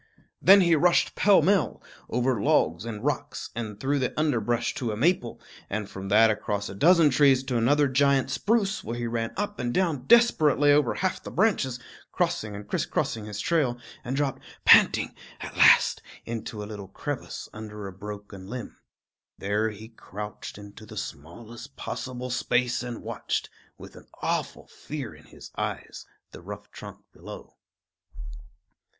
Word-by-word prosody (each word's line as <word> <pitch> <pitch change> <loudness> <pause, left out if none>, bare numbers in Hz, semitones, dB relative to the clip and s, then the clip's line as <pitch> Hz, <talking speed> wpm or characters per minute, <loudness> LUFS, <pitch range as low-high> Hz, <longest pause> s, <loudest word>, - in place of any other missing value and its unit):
Then 195 +1 +8
he 170 -2 +4
rushed 170 +3 +3
pell 200 -6 +4
mell 195 +3 +2 0.3
over 125 -2 0
logs 85 +3 +2
and 110 0 -6
rocks, 145 0 -3
and 110 -3 -6
through 140 +4 0
the 130 +3 -2
underbrush 120 -6 0
to 120 -4 -3
a 105 - -4
maple, 135 -3 +1 0.3
and 105 0 -3
from 95 -1 -7
that 110 +2 +6
across 105 -1 -3
a - - -7
dozen 165 - +5
trees 135 -1 +4
to 130 -2 -1
another 145 +5 +3
giant 135 0 +2
spruce, 210 - 0
where 115 +1 -5
he 120 - -3
ran 115 -1 -2
up 205 0 -3
and 120 -1 -1
down 155 -6 0
desperately 155 - +5
over 145 -4 +3
half 185 -1 -1
the - - -8
branches, 160 - +1 0.3
crossing 110 -1 -1
and 105 0 -9
crisscrossing 110 +1 -2
his 105 -1 -6
trail, 140 -4 +1 0.3
and 125 +2 -3
dropped 140 -2 -1 0.2
panting - - +6 0.3
at - - -8
last - - +6 0.2
into 115 -2 -5
a - - -6
little 105 -2 -8
crevice 140 +7 -6
under 105 -1 -8
a 95 - -7
broken 100 -1 -9
limb. 120 +2 -7 0.6
There 105 +3 0
he 110 +1 -10
crouched 105 -3 -8
into 100 +1 -12
the 110 - -10
smallest 115 - -8
possible 125 -1 -5
space 120 0 0
and 120 -2 -6
watched, - - -3 0.3
with - - -12
an - - -14
awful - - -2
fear 140 - -7
in 75 0 -17
his - - -13
eyes, - - -5 0.2
the - - -11
rough - - -9
trunk - - -10
below. - - -11
120 Hz, 160 wpm, -26 LUFS, 105-145 Hz, 0.6 s, Then